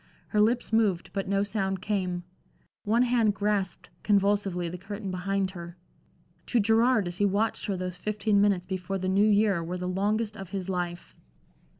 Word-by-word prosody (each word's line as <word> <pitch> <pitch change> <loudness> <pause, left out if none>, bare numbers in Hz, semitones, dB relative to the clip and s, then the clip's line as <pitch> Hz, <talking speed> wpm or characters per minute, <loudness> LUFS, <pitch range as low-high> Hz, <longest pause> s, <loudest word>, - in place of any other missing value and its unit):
Her 210 - +2
lips 235 +1 +1
moved, 205 -6 +2
but 195 -1 -2
no 200 +1 +1
sound 195 -2 -1
came; 185 -3 -2 0.6
one 230 +4 +3
hand 235 -4 +2
grasped 205 -4 -1
convulsively 200 -3 +1
the 180 +2 -6
curtain 200 +1 -6
behind 190 +1 -1
her. 175 -1 -9 0.7
To 245 - +2
Gerard 225 +1 +3
as 175 +1 -6
he 205 - +4
watched 210 +4 -1
her 195 -2 -1
those 180 -1 -4
fifteen 210 -1 +1
minutes 200 -3 +2
before 190 +1 -3
the 185 0 -3
New 200 +3 +3
Year 205 -4 +3
were 175 +2 -4
the 180 0 -4
longest 210 +4 0
of 195 -2 -8
his 195 -1 -4
life. 175 -2 -4
195 Hz, 175 wpm, -28 LUFS, 185-210 Hz, 0.7 s, he